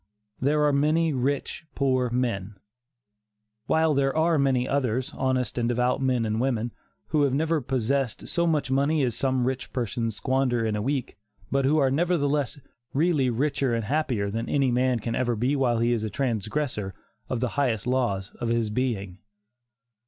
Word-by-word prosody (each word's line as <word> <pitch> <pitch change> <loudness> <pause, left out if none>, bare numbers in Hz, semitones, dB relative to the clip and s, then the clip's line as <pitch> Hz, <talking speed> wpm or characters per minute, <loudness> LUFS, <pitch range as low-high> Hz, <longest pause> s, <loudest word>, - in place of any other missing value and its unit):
"There 150 +3 +2
are 145 - +3
many 155 +3 +2
rich 135 +4 -2
poor 130 -2 +1
men," 115 -5 -2 1.1
while 160 -1 +3
there 135 +1 +1
are 160 -1 +3
many 130 -2 +2
others, 130 -2 -1
honest 130 -3 -1
and 120 0 0
devout 125 +2 +1
men 125 -3 +1
and 110 +1 -1
women, 120 -3 0 0.4
who 155 - +2
have 140 -2 +2
never 160 +1 +1
possessed 130 -1 -1
so 170 0 +1
much 150 -5 0
money 140 +3 +2
as 120 -2 0
some 130 -2 0
rich 130 0 -3
persons 115 -3 -2
squander 130 -1 0
in 110 -1 0
a 105 - -1
week, 135 0 -2 0.3
but 135 -1 +2
who 150 +3 +3
are 135 -3 +3
nevertheless 145 -3 0 0.4
really 150 -4 +2
richer 135 0 0
and 115 -2 -2
happier 125 -7 0
than 115 +2 -3
any 135 -3 +2
man 125 0 +2
can 115 +2 -3
ever 120 -1 0
be 125 +6 +1
while 125 -4 +2
he 115 +1 +2
is 115 -2 -1
a 110 - -2
transgressor 110 -2 -2 0.3
of 125 - -1
the 125 0 0
higher 130 -5 +1
laws 120 -6 0
of 120 - -2
his 115 -2 0
being. 105 -6 -2
130 Hz, 175 wpm, -26 LUFS, 115-140 Hz, 1.1 s, are